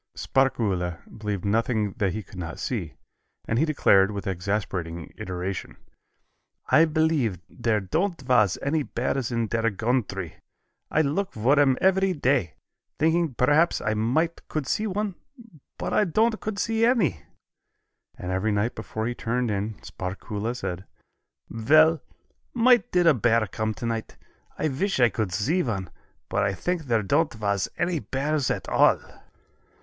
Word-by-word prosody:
Sparkuhle 100 -10 0 0.2
believed 105 -4 -4
nothing 110 -1 +1
that 95 -4 +1
he 110 +1 -4
could 90 +1 -11
not 85 -1 -5
see, 95 - -4 0.5
and 115 - +1
he 155 - +3
declared, 100 -10 +4
with 100 -1 -5
exasperating 90 -3 -3
iteration, 90 +1 -5 0.9
"I 160 - +7
believe 155 - +1
there 115 -3 0
don't 170 - -1
vas 125 -8 +3
any 150 +3 +1
bears 130 -1 -2
in 115 -1 0
der 115 +1 0
gountry. 105 -5 -2 0.5
I 160 - +2
look 170 +8 -1
for 130 +7 +3
'em 135 -3 +4
every 190 0 +3
day, 130 - +1 0.4
thinking 160 -3 +1
perhaps 145 +8 +3 0.2
might 145 +10 0
I - - -25
could 155 -3 -3
see 215 +10 0
one, 205 0 -2 0.6
but - - -3
I 210 - +4
don't 220 +5 +1
could 215 -2 -4
see 225 +2 0
any." 200 - +2 1.0
And 90 - -5
every 95 +4 0
night 105 +4 0
before 110 0 -5
he 120 - -1
turned 120 0 -1
in, 105 +2 -2
Sparkuhle 100 +5 -4
said: 95 -5 -4 0.6
"Vell, 155 +8 +4 0.5
might 245 0 +4
did 180 -1 +3
a 165 - +7
bear 115 -2 +2
come 110 +3 -3
tonight. 115 -2 -4 0.4
I 155 - 0
wish 170 +5 -1
I 120 -1 +6
could 110 -4 -2
see 125 - +1
one, 95 - -3 0.4
but 100 - 0
I 100 -1 0
think 175 - -2
there 115 -4 +1
don't 145 +6 +1
vas 100 -3 -1
any 175 -2 0
bears 145 0 -1
at - - -2
all." - - +4
120 Hz, 150 wpm, -25 LUFS, 100-155 Hz, 1.0 s, I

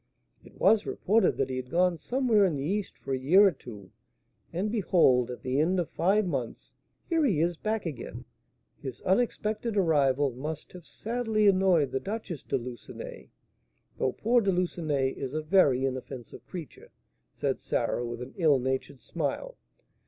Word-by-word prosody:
"It - - -17
was 210 +3 +4
reported 220 +4 +2
that 135 -1 0
he 130 - -2
had 125 -1 -5
gone 175 +2 +2
somewhere 245 -5 +2
in 180 -6 +2
the 135 - -3
East 195 +6 -2
for 135 - -5
a 130 - -1
year 180 +10 +6
or 195 - +5
two, 105 - -12 0.6
and 190 +5 -2
behold, 170 - +3
at 125 - -7
the 130 +2 0
end 180 +5 +2
of 170 - -2
five 200 +4 +2
months, 135 -9 -4 0.3
here 330 -2 +2
he 205 - +2
is 170 +2 +1
back 215 +4 -2
again! 145 -8 -6 0.6
His 130 -3 -7
unexpected 215 +1 0
arrival 145 -6 +3
must 150 +5 -6
have 180 -2 -12
sadly 225 -2 -1
annoyed 185 -7 +4
the 135 - -1
Duchess 200 - -5
de - - -1
Lucenay, 120 0 -9 0.7
though 130 - +1
poor 240 +2 +2
De 200 -2 +2
Lucenay 160 -7 0
is 135 +1 -5
a 155 - -1
very 145 -7 +4
inoffensive 130 -2 -6
creature," 170 -5 -9 0.4
said - - -2
Sarah, 120 - -1
with 120 0 -5
an 130 - -11
ill 155 -6 +4
natured 130 +1 -3
smile. 170 - -3
165 Hz, 165 wpm, -28 LUFS, 130-200 Hz, 0.7 s, year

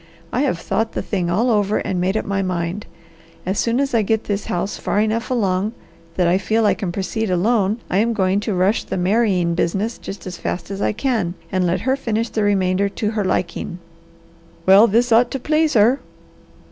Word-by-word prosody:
I 250 - +1
have 270 -11 +1
thought 225 +6 -2
the - - -3
thing 180 -4 -2
all 225 +8 +2
over 210 -1 +2
and 190 -3 -2
made 190 +4 +1
up - - -2
my 195 0 -1
mind. 180 +1 -3 0.6
As 190 +2 -1
soon 235 +2 +1
as 275 -2 0
I 230 - +4
get 220 +1 0
this 200 -1 -3
house 180 +3 -2
far - - 0
enough 220 +2 0
along 205 -3 0 0.4
that 180 -2 +2
I 180 +2 +3
feel 220 +3 +1
I - - +4
can 185 -4 -4
proceed 205 +4 -2
alone 200 +3 +2
I 185 - 0
am 230 +2 +2
going 190 -1 +1
to 205 -1 -2
rush 190 +5 +2
the - - -4
marrying 185 -2 +2
business 195 +7 -1
just 195 - -8
as 180 -1 -7
fast 175 +2 -4
as 195 0 -4
I - - +2
can, 220 -6 -1 0.2
and 185 -2 +1
let 180 +1 0
her 260 +4 +1
finish 230 -4 -2
the 220 - -2
remainder 200 -1 +2
to 210 +1 -2
her 215 -2 -1
liking." 180 -2 -2 0.9
"Well 195 +4 +7
this 235 +4 +2
ought 235 +2 +5
to 270 - -4
please 305 +2 +1
her." 235 +6 +4
205 Hz, 210 wpm, -20 LUFS, 185-225 Hz, 0.9 s, Well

